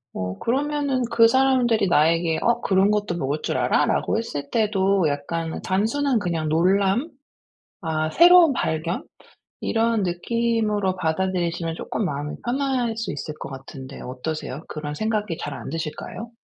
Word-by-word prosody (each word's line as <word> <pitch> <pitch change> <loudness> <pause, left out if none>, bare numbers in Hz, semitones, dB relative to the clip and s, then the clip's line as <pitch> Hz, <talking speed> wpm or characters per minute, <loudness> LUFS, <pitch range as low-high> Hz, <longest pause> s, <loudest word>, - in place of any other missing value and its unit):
어 95 0 -4
그러면은 280 +1 0
그 230 -1 +6
사람들이 245 -4 +3
나에게 165 0 +3
어 235 0 +2
"그런 195 +1 +3
것도 205 -4 -1
먹을 145 0 -2
줄 - - -1
알아?"라고 145 - +1
했을 145 -11 -5
때도 200 -4 +2
약간 160 +3 -3
단순한 230 +7 +1
그냥 165 -5 -2
놀람, 195 - +2 0.7
아 155 -2 -1
새로운 345 - +7
발견? 165 -5 -2 0.6
이런 225 -1 +1
느낌으로 210 +1 0
받아들이시면 170 -1 -1
쪼끔 215 - -3
마음이 145 -3 -3
편할 250 -2 0
수 225 -2 -3
있을 145 +2 -5
것 - - -6
같은데 135 0 -9
어떠세요? 140 +2 -5
그런 150 -1 -5
생각이 210 -2 -2
잘 145 - -5
안 - - -7
드실까요? 165 +8 -5
190 Hz, 310 characters per minute, -23 LUFS, 155-230 Hz, 0.7 s, 새로운